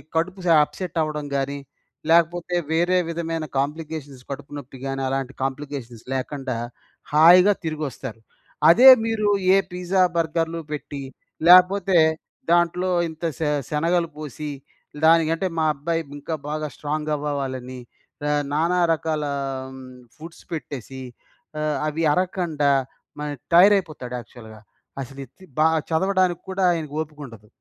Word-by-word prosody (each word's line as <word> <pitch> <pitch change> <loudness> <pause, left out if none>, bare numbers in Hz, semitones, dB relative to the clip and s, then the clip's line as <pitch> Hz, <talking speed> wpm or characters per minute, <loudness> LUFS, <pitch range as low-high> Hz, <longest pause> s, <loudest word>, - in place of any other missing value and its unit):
కడుపు 185 +4 -1
స - - -1 0.2
అప్సెట్ 175 +3 -6
అవ్వడం 150 -1 -3
గాని, 140 +1 -2 0.5
లేకపోతే 170 +1 +2 0.2
వేరే 175 +3 +2
విధమైన 165 -1 -3
కాంప్లికేషన్స్, 145 -2 -4
కడుపు 140 0 -7
నొప్పి 135 -1 -10
గాని, 135 0 -3
అలాంటి 135 0 -3
కాంప్లికేషన్స్ 135 -4 -5
లేకండా 130 -1 -3 0.6
హాయిగా 180 +6 +7
తిరిగొస్తారు. 145 -7 -5 0.5
అదే 245 +10 +9 0.2
మీరు 215 -2 0 0.3
ఏ - - +6
పిజ్జా, 180 +1 0 0.2
బర్గర్‌లు 165 0 -1
పెట్టి, 145 -1 -5 0.5
లేకపోతే 185 +1 +6 0.5
దాంట్లో 175 +2 +2 0.2
ఇంత 160 +1 -12 0.2
శ - - -9 0.3
శనగలు 170 +3 +1
పోసి, 150 0 -6 0.6
"దానికంటే, 165 +2 +4
మా 160 - +2
అబ్బాయి 165 +4 -2 0.2
ఇంకా 160 +3 -4
బాగా 155 0 -2
స్ట్రాంగ్" 150 +1 -3
అవ్వవ్వాలని 130 -3 -4 0.4
ర 150 - -1 0.3
నానా 170 +4 +2
రకాలా 155 -2 -2 0.4
హ్మ్, 130 -1 -12
ఫుడ్స్ 165 +2 -12
పెట్టేసీ 135 -3 -6 0.6
ఆహ్, 150 -2 0
అవి 155 +2 -2
అరకండా 170 -5 0 0.5
మరి 150 0 -3 0.2
టైయర్ 195 +4 +8
అయిపోతాడు, 150 -9 -5
యాక్చువల్‌గా 110 -2 -13 0.4
అసల 135 +2 -9
ఎత్తి 160 +9 -22 0.2
బా 155 - +5 0.2
చదవడానికి 185 +1 +1
కూడా, 190 0 -1
ఆయన‌కు 155 -3 -5
ఓపికుండదు. 140 -9 -10
155 Hz, 120 wpm, -23 LUFS, 140-170 Hz, 0.6 s, అదే